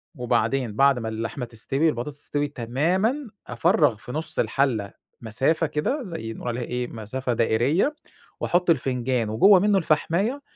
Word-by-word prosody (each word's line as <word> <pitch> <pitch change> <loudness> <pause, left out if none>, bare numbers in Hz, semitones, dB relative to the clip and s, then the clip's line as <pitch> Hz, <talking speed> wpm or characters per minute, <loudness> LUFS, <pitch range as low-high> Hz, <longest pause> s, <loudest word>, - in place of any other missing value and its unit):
وبعدين 125 -1 0
بعد 135 +1 +4
ما 110 -1 -4
اللحمة 115 +3 -4
تستوي 135 +7 0
البطاطس 140 +2 -4
تستوي 145 0 -1
تمامًا 170 - -1 0.2
أفرَّغ 170 - +2
في 115 - -10
نُص 155 +3 -3
الحلة 115 -3 0 0.3
مسافة 135 +9 +1
كده 205 - -1
زي 165 - -6
نقول - - -8
عليها 120 +1 -2
إيه 125 +1 -3
مسافة 120 +3 -4
دائرية، 125 - +1 0.4
واحُط 175 0 +1
الفنجان 125 -6 +1
وجوه 185 - +6
منه 205 +1 +3
الفحماية، 190 - 0
135 Hz, 140 wpm, -24 LUFS, 120-165 Hz, 0.4 s, وجوه